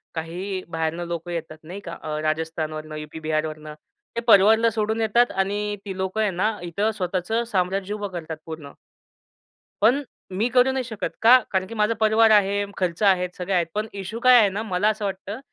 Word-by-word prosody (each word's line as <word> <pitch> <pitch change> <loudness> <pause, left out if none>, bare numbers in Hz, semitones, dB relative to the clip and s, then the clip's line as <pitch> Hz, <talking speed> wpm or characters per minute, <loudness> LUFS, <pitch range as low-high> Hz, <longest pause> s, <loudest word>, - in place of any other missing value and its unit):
काही 185 +4 -4
बाहेरनं 165 +1 -2
लोकं 170 0 -5
येतात 160 -2 -5
नाही 180 +5 -8
का 170 - -6 0.2
राजस्थानवरनं, 155 0 -3
यूपी 150 +1 -7
बिहारवरनं. 155 -1 -3 0.4
ते 235 - -1
परिवारला 220 +2 +6
सोडून 220 0 -1
येतात 235 +3 +3
आणि 205 +2 -1
ती 190 -1 -5
लोकं 190 +3 -1
आहे 210 - +2
ना 210 +4 0
इथं 200 +6 -1
स्वतःच 185 -1 -3 0.2
साम्राज्य 190 +1 0
उभं 205 -1 -3
करतात 160 -3 -6
पूर्ण 155 -3 -8 1.1
पण 260 +6 +4 0.4
मी 225 +4 +2
करू 250 +1 +4
नाही 260 -1 -1
शकत, 220 -5 -4
का? 240 +3 +8
कारण 190 -1 +1
की 230 - -8
माझा 210 +1 +2
परिवार 220 +1 +4
आहे, 200 -1 +3
खर्च 180 0 -2
आहेत, 180 -2 +3
सगळे 185 +2 -3
आहेत. 175 -2 +2
पण 215 +1 -1
इश्यू 220 +5 -6
काय 255 -1 +8
आहे 205 -3 +4
ना? 205 +3 -4
मला 205 0 +1
असं 215 -1 -2
वाटतं 195 +3 -5
195 Hz, 180 wpm, -24 LUFS, 170-215 Hz, 1.1 s, का